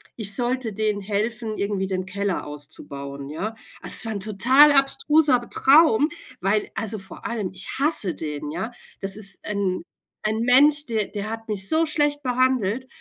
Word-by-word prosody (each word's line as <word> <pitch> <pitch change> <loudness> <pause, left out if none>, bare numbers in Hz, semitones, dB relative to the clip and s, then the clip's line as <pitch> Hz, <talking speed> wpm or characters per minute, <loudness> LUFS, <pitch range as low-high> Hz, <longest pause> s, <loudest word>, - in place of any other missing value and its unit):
ich 205 -3 +2
sollte 245 -1 -1
denen 210 0 -1
helfen, 215 +2 -2
irgendwie 200 -1 -2
den 185 -1 -3
Keller 200 0 -3
auszubauen, 140 -1 -7
ja. 205 +9 -5 0.3
Also, - - 0
es - - +6
war 225 - -3
'n 205 - -4
total 240 +9 +5
abstruser 275 -2 +3
Traum, 295 -1 +4 0.3
weil, 205 +2 0
also 220 +1 0
vor 190 +1 -11
allem, 215 -6 -3
ich 190 0 -6
hasse 275 - +2
den, 150 -1 -5
ja. 190 +9 -4 0.3
Das 195 0 +2
ist 200 -3 0
'n 200 -3 -2 0.4
'n 215 +1 0
Mensch, 285 +5 +4
der 220 -5 -2
der 205 0 -6
hat 225 0 -7
mich 195 -2 +1
so 320 +1 +2
schlecht 295 -1 0
behandelt 255 -2 0
215 Hz, 165 wpm, -23 LUFS, 195-255 Hz, 0.4 s, es